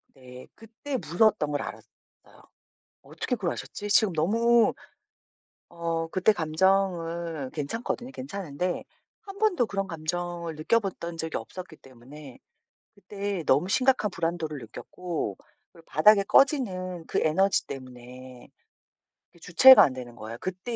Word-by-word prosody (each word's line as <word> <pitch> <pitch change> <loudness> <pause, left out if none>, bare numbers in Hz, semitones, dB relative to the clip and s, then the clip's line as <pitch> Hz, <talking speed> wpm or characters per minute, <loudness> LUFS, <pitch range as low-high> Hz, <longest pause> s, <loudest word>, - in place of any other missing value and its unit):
네. 125 -1 -13
그때 235 +5 -6
무서웠던 170 -4 +1
걸 145 -1 -1
알았어요. - - -9 1.1
어떻게 250 - -4
그걸 190 -6 -2
아셨지? 205 - -7
지금 205 -1 +4
너무 230 +8 +3 1.0
어 165 -1 -3
그때 185 +5 +2
감정은 170 -3 0
괜찮거든요. 230 - -4
괜찮은데 185 - -4 0.4
1 400 -2 -11
번도 390 - +2
그런 195 -1 -3
감정을 170 0 -4
느껴봤던 170 0 -1
적이 160 -1 -3
없었기 180 -4 -9
때문에 135 +2 -14 0.6
그때 200 -3 -5
너무 145 +7 +3
심각한 255 -2 +2
불안도를 165 -3 -3
느꼈고 150 - -6 0.4
그리고 165 -1 -18
바닥에 200 +5 +5
꺼지는 185 - +1
그 - - 0
에너지 190 +5 +2
때문에 125 -1 -11 0.8
그 170 - -22
주체가 210 +8 +8
안 140 - +1
되는 125 -2 -9
거예요. 115 0 -8
그때 185 +6 -5
175 Hz, 290 characters per minute, -26 LUFS, 155-205 Hz, 1.1 s, 주체가